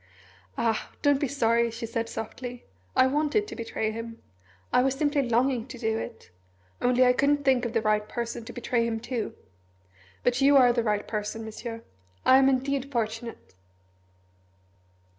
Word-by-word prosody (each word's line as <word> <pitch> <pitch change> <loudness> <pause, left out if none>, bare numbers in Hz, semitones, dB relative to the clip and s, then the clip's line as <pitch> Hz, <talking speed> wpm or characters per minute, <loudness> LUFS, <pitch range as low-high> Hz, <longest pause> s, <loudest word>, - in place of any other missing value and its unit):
"Ah 225 -2 0
don't 285 -2 +4
be 285 - 0
sorry," 235 -3 +2
she 230 +1 -6
said 230 0 -3
softly. 245 +2 -6 0.3
"I 255 - +6
wanted 300 +9 +1
to - - -7
betray 225 -2 -2
him. 230 +1 -7 0.5
I - - +5
was 265 +1 +1
simply 290 0 +1
longing 245 0 +1
to 255 - -9
do 225 -1 -1
it 225 - -8 0.5
only 250 +1 +4
I 250 - +5
couldn't 285 +2 +2
think 260 -2 +3
of 235 - -3
the 225 -2 +1
right 210 0 +1
person 235 -1 -4
to - - -7
betray 235 -1 0
him 225 -1 -2
to! 240 -2 -4 0.9
But 245 +2 +1
you 280 +1 +6
are 250 -2 +6
the 235 - +1
right 210 -2 -1
person, 215 +1 -4
Monsieur. 230 +1 -7 0.4
I 260 - +7
am 270 0 +5
indeed 275 +1 -1
fortunate!" 225 - -4
240 Hz, 165 wpm, -27 LUFS, 225-265 Hz, 0.9 s, I